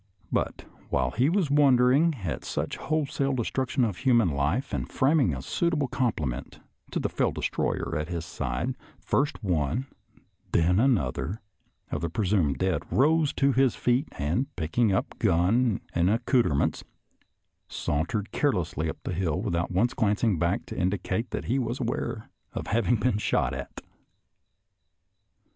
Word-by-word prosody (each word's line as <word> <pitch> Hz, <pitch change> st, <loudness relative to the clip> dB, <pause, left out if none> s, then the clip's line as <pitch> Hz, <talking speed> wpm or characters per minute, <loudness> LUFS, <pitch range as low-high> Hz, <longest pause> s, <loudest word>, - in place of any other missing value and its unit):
But -, -, -1 dB, 0.2 s
while 65 Hz, -1 st, +1 dB
he 125 Hz, -, +2 dB
was 175 Hz, -5 st, +1 dB
wondering 140 Hz, +2 st, +4 dB
at 80 Hz, -, -3 dB
such -, -, -3 dB
wholesale 140 Hz, -3 st, -1 dB
de 125 Hz, -3 st, 0 dB
struction 130 Hz, -1 st, 0 dB
of 100 Hz, -5 st, -3 dB
human 120 Hz, -8 st, +3 dB
life 75 Hz, -, -1 dB
and -, -, -3 dB
framing 140 Hz, -, +3 dB
a 65 Hz, -3 st, -5 dB
suitable 155 Hz, -, 0 dB
compliment 75 Hz, -, -2 dB, 0.3 s
to -, -, -2 dB
the -, -, 0 dB
fell -, -, 0 dB
destroyer -, -, -2 dB
at 75 Hz, +1 st, -2 dB
his 85 Hz, -2 st, -3 dB
side, 70 Hz, -, -3 dB, 0.3 s
first 145 Hz, -3 st, -1 dB
one 90 Hz, -, 0 dB
and -, -, -33 dB
then 90 Hz, +3 st, +3 dB
another 100 Hz, -, +1 dB, 0.5 s
of -, -, -2 dB
the 85 Hz, -, -1 dB
presumed 90 Hz, -6 st, +1 dB
dead 95 Hz, -1 st, 0 dB
rose 155 Hz, +2 st, +3 dB
to 140 Hz, 0 st, +3 dB
his 130 Hz, -2 st, +3 dB
feet, 125 Hz, +5 st, +1 dB
and, 85 Hz, -, -1 dB
picking 90 Hz, +7 st, +1 dB
up 95 Hz, -, -1 dB
gun 100 Hz, +7 st, +2 dB
and 85 Hz, +1 st, +2 dB
accouter 115 Hz, -, +2 dB
ments, 70 Hz, -, 0 dB, 0.8 s
sauntered 90 Hz, +8 st, -2 dB
carelessly 85 Hz, -, 0 dB
up -, -, -5 dB
the -, -, -3 dB
hill 85 Hz, -5 st, -1 dB
without 85 Hz, 0 st, -1 dB
once 110 Hz, +8 st, +1 dB
glancing 105 Hz, -3 st, +1 dB
behind 85 Hz, +4 st, 0 dB
to -, -, -7 dB
indicate 95 Hz, +4 st, -1 dB
that -, -, -4 dB
he 130 Hz, +4 st, +1 dB
was 120 Hz, 0 st, -2 dB
aware 115 Hz, -2 st, -3 dB, 0.2 s
of -, -, -4 dB
having 115 Hz, +2 st, +2 dB
been 110 Hz, -1 st, +1 dB
shot -, -, +1 dB
at. -, -, -7 dB
110 Hz, 155 wpm, -27 LUFS, 85-130 Hz, 0.8 s, wondering